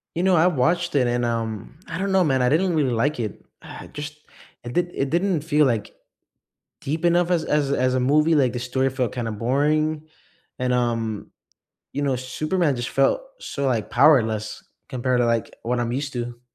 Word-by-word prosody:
You 170 - -1
know, 185 -1 +4
I 165 +2 +5
watched 175 +2 +1
it 130 -3 +3
and, 120 0 0
um, 115 +1 -3
I 165 - -4
don't 195 +1 -1
know, 190 -1 +4
man, 135 -4 +2
I 125 - +3
didn't 170 +6 +2
really 145 -5 +2
like 125 +4 0
it. 110 -3 -5 0.2
Ah, - - -10
just, 150 0 -7 0.5
it 120 - -6
did 175 +3 0
it 135 0 -1
didn't 175 -2 +1
feel, 150 -1 +3
like, 115 -5 -1 0.9
deep 155 +4 -2
enough 175 0 +3
as 170 -3 +2
as 145 -2 +1
as 130 -2 +1
a - - +2
movie. 150 +5 +3
Like, 130 -5 +2
the 120 - -3
story 130 +2 0
felt 130 -4 -2
kinda 115 -3 -3
boring 150 +7 0 0.5
and, 125 0 0
um, 115 -4 -1 0.6
you 145 - -2
know, 140 -2 +1
Superman 155 +5 -1
just 120 0 -4
felt 135 - +2 0.2
so, 140 - -4
like, 115 -5 -1
powerless 115 -6 +3 0.3
compared 125 0 0
to, 120 - +3
like, 115 -1 -1
what 120 +1 -1
I'm 120 -1 -1
used 140 +3 -3
to. 120 -1 -5
135 Hz, 195 wpm, -23 LUFS, 120-155 Hz, 0.9 s, I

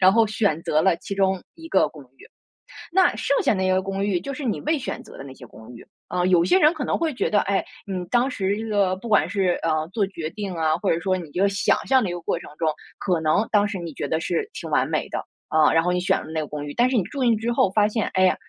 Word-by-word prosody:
然 190 0 +6
后 225 0 +4
选 205 -7 0
择 155 +1 +2
了 190 -3 +3
其 200 - -6
中 190 -1 +1
一 325 0 -11
个 - - +3
公 150 - -13
寓， - - -16 0.7
那 370 - +4
剩 255 +5 +1
下 - - +3
那 190 -1 0
个 185 0 +3
公 195 +1 -3
寓， 195 -4 +1
就 275 +9 -6
是 290 0 -6
你 230 - -1
未 310 +2 +1
选 265 - -5
择 - - -14
的 - - -9
那 135 - -10
些 125 - -12
公 110 +1 -14
寓。 - - -13 0.2
啊， 180 0 -1
有 180 -2 +4
些 180 +1 +4
人 310 +3 +5
可 300 -4 -4
能 - - 0
会 325 -2 -1
觉 245 - -1
得， 205 - +3
哎， 195 -1 0 0.2
你 185 -2 -4
当 245 +6 +2
时 200 -1 -1
这 225 0 -5
个 200 -3 +1
不 235 +5 -9
管 210 -4 +3
是， 190 -3 0
呃， 155 -1 0
做 215 - +1
决 165 -5 -6
定 200 -4 -5
啊， 160 -1 +1
或 200 - -1
者 165 - +1
说 185 +1 0
你 170 -5 -6
这 175 - -4
个 - - +5
想 195 0 +2
象 260 -3 +4
的 185 - -1
一 - - -3
个 175 - -5
过 - - -2
程 - - -11
中， 160 - -1 0.3
可 175 -4 0
能 160 +8 +2
当 205 -1 +4
时 200 - -4
你 170 -3 -6
觉 145 - -4
得 160 +2 0
是 425 - -2
挺 - - -7
完 - - +2
美 - - -1
的， - - -3 0.3
啊， 155 -1 +4
然 165 0 +3
后 180 - +1
你 180 - +1
选 180 - +2
了 155 - -9
那 160 - -1
个 150 - -3
公 145 -1 -5
寓， 145 - -6
但 245 +1 +3
是 260 - -1
你 195 - +2
住 275 +6 -6
进 235 -2 +4
去 - - -5
之 230 +2 -1
后 195 - +3
发 210 0 +3
现， 215 -1 -1
哎 185 - +4
呀， 185 - +4
190 Hz, 325 characters per minute, -23 LUFS, 170-220 Hz, 0.7 s, 然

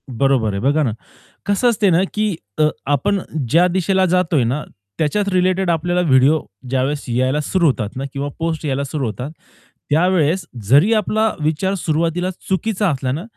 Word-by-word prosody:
बरोबर 125 -4 +1
आहे 100 - -2
बघा 145 +4 +2
ना, 125 - 0 0.5
कसं 205 +5 +2
असते 210 -3 +2
ना 175 0 +3
की 210 -3 0 0.2
अ, - - +5 0.2
आपण 145 +8 +1 0.3
ज्या 170 +6 +4
दिशेला 190 +1 +1
जातोय 175 -6 +2
ना, 130 +6 -1 0.3
त्याच्याच 200 +7 0
रिलेटेड 185 0 +1
आपल्याला 175 +2 +1
व्हिडिओ 135 +4 +4 0.3
ज्यावेळेस 135 +3 -1
यायला 130 +4 +1
सुरू 170 +3 +1
होतात 115 -7 0
ना. 135 - -4
किंवा 140 +1 -3
पोस्ट 165 -1 -2
यायला 140 -1 -1
सुरु 140 0 -3
होतात. 125 +6 -5 0.6
त्यावेळेस 170 +2 +2 0.2
जरी 145 - +5
आपला 215 0 +1
विचार 160 +5 0
सुरुवातीला 170 +1 -1 0.2
चुकीचा 200 +1 0
असला 130 -4 -2
ना, 155 +6 -3
160 Hz, 160 wpm, -19 LUFS, 140-185 Hz, 0.6 s, अ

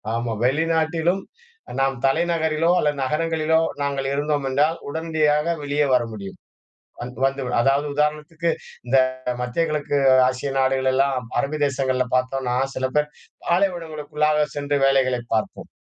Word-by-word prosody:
ஆமா 115 0 -2
வெளிநாட்டிலும் 160 +5 +1 0.6
நாம் 135 0 +1
தலைநகரிலோ 160 +2 +1
அல்லது 145 -1 0
நகரங்களிலோ 160 +2 +1 0.2
நாங்கள் 140 -1 -1
இருந்தோம் 145 0 -1
என்றால் 150 +5 +2
உடனடியாக 155 0 +1
வெளியே 145 +1 +1
வர 125 - +2
முடியும். 100 -2 -8 0.6
வந்-வந்து 135 +3 -1 0.2
அதாவது 140 +3 +2
உதாரணத்துக்கு 150 +3 -1 0.4
இந்த 130 +2 +3 0.4
மத்திய 125 +7 0
கிழக்கு 150 -1 -1 0.3
ஆசிய 130 +2 -3
நாடுகள் 130 0 +2
எல்லாம் 130 -2 +1
அரபு 145 +4 -2
தேசங்கள்ல 130 -2 0
பாத்தோம்னா 130 -1 0 0.2
சில 130 - 0
பேர் 150 0 +1 0.4
பாலைவனங்களுக்குள்ளாக 155 -4 0
சென்று 145 0 0
வேலைகளைப் 130 -3 +1
பார்ப்போம். 110 - -3
145 Hz, 120 wpm, -22 LUFS, 130-155 Hz, 0.6 s, இந்த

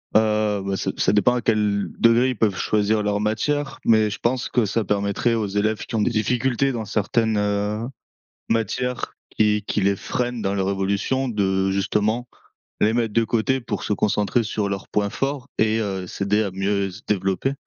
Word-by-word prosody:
Heu 105 -2 +2
ben, 100 0 -1
ça - - -1
ça - - +2
dépend 105 +4 +4
à 125 - -1
quel 105 -3 +1
degré 115 +2 +5
ils 125 - -3
peuvent 105 -4 +2
choisir 105 0 +1
leurs 105 0 0
matières. 135 +8 -1
Mais 110 -2 +4
je 100 - -6
pense 125 +1 0
que 120 -3 +2
ça 110 +3 0
permettrait 100 +3 0
aux 110 -2 0
élèves 105 +2 -1
qui - - -5
ont 110 - +2
des 120 - +2
difficultés 125 +4 +1
dans 115 -4 -4
certaines, 110 +1 0
heu, 105 +2 -1 0.6
matières, 115 +3 -1 0.2
qui 105 -1 +2
qui - - -1
les 100 0 +2
freinent 120 +2 -3
dans 100 -1 0
leur 95 -1 0
évolution 100 +7 0
de, 95 -3 +1
justement, 105 +5 0 0.5
les 110 +2 +3
mettre 115 -3 0
de 115 - +3
côté 120 +4 +1
pour 110 -4 -4
se - - 0
concentrer 105 +3 +1
sur 105 -2 -2
leurs 100 -1 -4
points 105 -1 0
forts 135 +2 -3
et 110 0 +2
heu, 95 -4 -2
s'aider 105 +3 0
à 100 - -3
mieux 100 +1 -1
se 90 - -11
développer. 95 +5 0
105 Hz, 190 wpm, -23 LUFS, 100-115 Hz, 0.6 s, degré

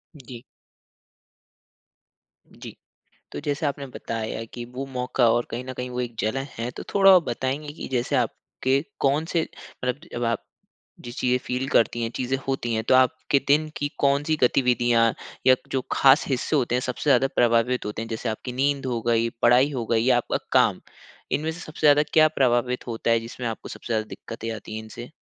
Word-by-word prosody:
जी। 125 -4 -11 2.1
जी। - - -11 0.6
तो - - -5
जैसे 145 +1 -2
आपने 140 0 -3
बताया 115 -3 -5
कि 120 - -5
वो 135 +2 -3
मौका 125 -2 +1
और 120 +1 +2
कहीं 120 +2 -4
न 130 - -6
कहीं 125 0 -5
वो 125 0 -3
एक 120 -1 -4
जलन 135 +6 -1
है। 115 +2 -2
तो - - -8
थोड़ा 195 -1 +7
आप 180 - +6
बताएँगी 135 +5 -3
कि - - -7
जैसे 130 +3 0
आपके 130 +2 -1 0.2
कौन 140 +3 +2
से 170 - +2 0.2
मतलब 125 +2 -4
जब 120 - -2
आप 115 0 -1 0.6
जिस 120 0 -9
चीज़ें 125 0 +2
फ़ील 125 +2 -2
करती 120 -1 +2
है 115 - -1
चीज़े 130 +1 -1
होती 120 -3 -1
है, 110 - 0
तो 115 - +2
आपके 130 +2 +3
दिन 155 +2 +3
की 145 - -1
कौन-सी 145 +3 +2
गतिविधियाँ 120 -2 +3 0.3
या 130 0 +7 0.2
जो 135 - +1
खास 135 +3 +5
हिस्से 135 +3 0
होते 120 -4 +1
हैं 125 - +2
सबसे 125 +4 -2
ज़्यादा 135 - +5
प्रभावित 120 +1 +2
होते 105 +1 -4
है? 115 - -7
जैसे 115 +1 -4
आपकी 110 +3 -4
नींद 135 +1 0
हो 120 -2 -1
गई, 115 0 +2
पढ़ाई 125 +4 +5
हो 125 -4 -3
गयी 115 0 +1
या 125 - +5
आपका 120 - -1
काम? - - +3 0.5
इनमें 155 +2 0
से 170 - -10
सबसे 155 -2 -10
ज़्यादा 145 0 +6
क्या 155 -1 +6
प्रभावित 125 -4 +1
होता 115 0 -2
है 115 0 +4
जिसमें 120 +2 -7
आपको 110 - -6
सबसे - - -10
ज़्यादा 110 -1 0
दिक्कतें 115 +1 -7
आती 110 +1 -9
है - - -4
इनसे? 120 +2 -10
125 Hz, 190 wpm, -24 LUFS, 115-140 Hz, 2.1 s, थोड़ा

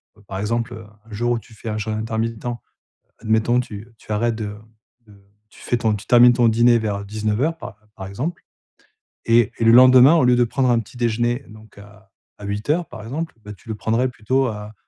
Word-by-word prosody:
bah 105 - -22
par 95 - -5
exemple, 115 +3 -2
heu, 110 -1 -10 0.2
un 115 - -19
jour 120 +3 -1
où 120 - -2
tu 115 - -19
fais 110 +1 -8
un 105 - -3
jeune 110 0 -3
intermittent, 110 +1 -3 0.7
admettons 110 +2 +1
tu, 105 -4 -7
heu, 115 +1 -20
tu - - -19
arrêtes 115 +2 0
de 105 -2 -5 0.5
de 100 -1 -19 0.3
tu - - -18
fais 120 - -1
ton 110 -2 0
tu 105 0 -8
termines 120 0 +6
ton 120 -1 +3
dîner 120 +1 +4
vers 100 -2 -3
19:00 110 +10 -1
par 120 -7 -10 0.2
par 95 -1 -7
exemple, 140 - -5 0.8
et 115 -2 +3
et 115 - 0
le 115 - +6
lendemain 130 +4 +7
au 160 - +3
lieu 125 0 +4
de 120 - +3
prendre 130 +2 0
un 120 -1 +3
petit 115 +2 -13
déjeuner 120 +2 -1
donc 110 -1 -16
à 105 0 -17 0.3
à 105 - -11
8:00 130 +12 -1
par 115 -3 -10
exemple, 155 +8 -5
bah, 105 - -8
tu 110 +3 -18
le 110 - -3
prendrais 115 +4 0
plutôt 130 +3 -1
à 105 -2 -6
115 Hz, 220 wpm, -21 LUFS, 105-120 Hz, 0.8 s, lendemain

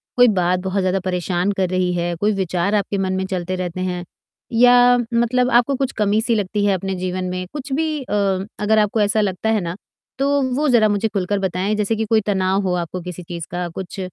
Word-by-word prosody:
कोई 245 0 +6
बात 180 -4 +1
बहुत 190 +1 -2
ज़्यादा 185 +1 +1
परेशान 180 +1 -1
कर 185 -2 +1
रही 185 -1 0
है? 175 0 -1
कोई 205 +5 +1
विचार 190 +1 0
आपके 200 -1 -1
मन 190 -1 -1
में 190 0 -1
चलते 185 -1 -3
रहते 185 0 -4
हैं, 180 -1 -2 0.5
या 245 +1 +6 0.2
मतलब 245 +2 +2
आपको 245 +3 +3
कुछ 270 0 -1
कमी-सी 215 +3 +2
लगती 205 0 -1
है 200 - +3
अपने 190 +1 -2
जीवन 185 0 -3
में? 185 0 -3
कुछ 275 -2 -6
भी 315 +3 +1 0.2
अ, - - -6 0.5
अगर 215 +1 +2
आपको 210 +1 +1
ऐसा 215 +1 +2
लगता 200 +2 -1
है 220 - +2
ना, 170 0 -4 0.4
तो 280 +1 +2
वो 300 +2 +1
ज़रा 230 -3 +5
मुझे 205 +2 +1
खुलकर 200 -1 -1
बताएँ। 190 +2 -1
जैसे 210 +1 0
कि 220 0 -1
कोई 220 0 +2
तनाव 190 -1 +1
हो 180 - 0
आपको 180 +2 -6
किसी 180 0 -7
चीज़ 170 -1 -7
का, 175 0 -3
कुछ 190 +3 -7
195 Hz, 215 wpm, -20 LUFS, 180-220 Hz, 0.5 s, कोई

